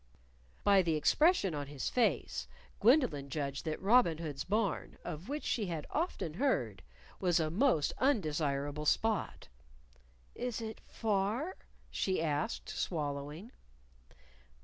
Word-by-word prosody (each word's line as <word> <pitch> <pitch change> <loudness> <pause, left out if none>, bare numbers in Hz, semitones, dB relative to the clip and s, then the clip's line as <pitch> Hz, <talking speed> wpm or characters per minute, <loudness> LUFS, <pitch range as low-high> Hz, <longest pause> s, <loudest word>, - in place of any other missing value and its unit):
By 200 -1 +6
the 165 -3 +1
expression 295 - +3
on 145 -1 -4
his 140 -2 -4
face, 245 -3 +1 0.3
Gwendolyn 220 - +3
judged 140 -1 -3
that 155 -1 -2
Robin 200 -5 +4
Hood's 150 -4 -4
Barn 205 -2 -1
of 160 - -6
which 295 +1 -3
she 215 -5 -1
had 165 -4 -4
often 310 - -2
heard 125 - 0 0.4
was 175 -3 +2
a 155 -1 0
most 200 - +2
undesirable 150 - 0
spot. 220 +2 0 0.9
"Is 245 -2 -3
it 220 -1 -6
far?" 220 - -1 0.4
she 190 -1 0
asked, 150 -2 -1
swallowing. 150 - -3
175 Hz, 120 wpm, -33 LUFS, 150-225 Hz, 0.9 s, By